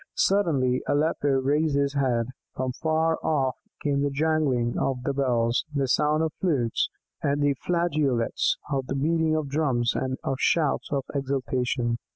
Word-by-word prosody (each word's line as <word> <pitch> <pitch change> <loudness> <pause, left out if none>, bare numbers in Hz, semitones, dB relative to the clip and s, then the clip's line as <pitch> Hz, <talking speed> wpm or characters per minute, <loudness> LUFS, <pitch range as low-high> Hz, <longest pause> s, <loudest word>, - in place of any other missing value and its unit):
Suddenly 145 -11 +2
Aleppo 145 0 +1
raised 140 +3 +2
his 140 0 +1
head; 130 -4 +1 0.3
from 130 0 -1
afar 160 +4 0
off 135 -5 +1 0.3
came 140 -1 +1
the 145 - +1
jangling 140 -5 +1
of 130 -2 -1
many 140 - -1
bells, 120 -3 +1
the 140 -2 0
sound 150 +4 +2
of 160 -2 -1
flutes 135 -11 +1 0.3
and 145 0 +1 0.2
flageolets, 155 -9 +1
of 135 -2 -1
the 135 - -2
beating 160 +2 +1
of 155 -2 -1
drums 135 -5 +1
and 130 0 -2
of 135 - -1
shouts 155 -4 +1
of 140 -2 0
exultation. 130 -3 -1
140 Hz, 150 wpm, -26 LUFS, 130-155 Hz, 0.3 s, Suddenly